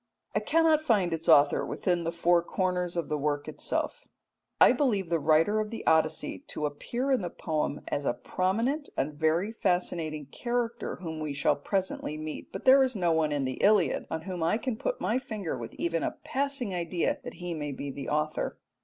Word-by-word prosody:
I - - +2
cannot 325 -2 +3
find 205 - +2
its 165 0 -2
author 145 0 +6
within 175 -2 -1
the 165 - 0
four 170 0 +3
corners 180 0 -1
of 170 - -1
the 150 -1 -1
work 145 0 -1
itself. - - -2 0.5
I - - +8
believe 205 - +1
the 165 - +2
writer 160 +8 +3
of 215 0 -2
the 225 - -6
Odyssey 160 -1 +2
to 150 - -3
appear 240 - -2
in 260 - +3
the 175 - -3
poem 155 -3 -2
as 145 - -2
a 120 - 0
prominent 230 +11 -1
and 150 +2 0
very 160 +7 +1
fascinating 170 -7 -1
character 240 -1 -2
whom 160 -3 -6
we 155 -2 -3
shall 145 - +2
presently 185 -1 -2
meet, 155 0 -6
but - - -7
there 265 +1 +8
is 260 -2 +2
no 175 -4 +1
one 160 -2 +2
in 145 -2 0
the 130 0 -4
Iliad 205 -3 +3
on 160 - -3
whom 180 -2 -5
I 165 +6 +2
can 250 0 -2
put - - -2
my 255 - +1
finger 215 - -4
with 115 -2 -7
even 165 -1 -1
a - - -2
passing 275 -6 -2
idea 175 -1 -1
that - - -7
he 175 -1 -5
may 150 -2 -4
be 140 +1 -5
the 140 0 -6
author. 150 +1 -1
175 Hz, 200 wpm, -29 LUFS, 155-215 Hz, 0.5 s, I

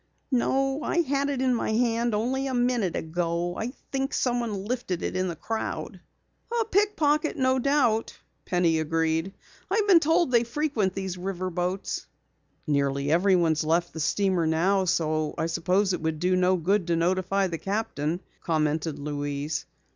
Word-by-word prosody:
"No, 270 +3 +1
I 345 - +1
had 280 -2 0
it 265 -2 -1
in 255 -1 +3
my 230 -2 -1
hand 235 0 +1
only 260 +5 -1
a 260 - -2
minute 245 -7 +1
ago. 170 +1 -2
I 230 +3 -3 0.2
think 270 0 -1
someone 235 -6 -1
lifted 215 -7 -3
it - - -2
in 185 0 0
the 170 - -3
crowd." 225 +7 -4 0.6
"A 455 - +1
pickpocket, 325 -8 +1
no 260 -1 +2
doubt," 250 -5 +1 0.2
Penny 170 -3 +2
agreed. 165 +3 0 0.4
"I've 415 +2 +1
been 370 -4 +7
told 325 -1 +2
they 235 -1 +4
frequent 235 -6 -1
these 190 -2 -4
river 185 0 -3
boats." 180 +3 -3 0.6
"Nearly 140 -1 0
everyone 175 -1 +4
has 155 0 0
left 170 +3 +1
the 160 - -6
steamer 185 +1 +1
now, 185 +5 +2
so 155 -3 0
I - - 0
suppose 180 +4 +1
it 180 - -3
would 160 -1 -1
do 180 +3 +1
no 185 0 +3
good 185 +2 +1
to 170 - +2
notify 185 +3 +1
the 170 -3 -3
captain," 195 -5 -2 0.2
commented 155 -1 0
Louise. 145 0 -3
190 Hz, 160 wpm, -26 LUFS, 165-245 Hz, 0.6 s, been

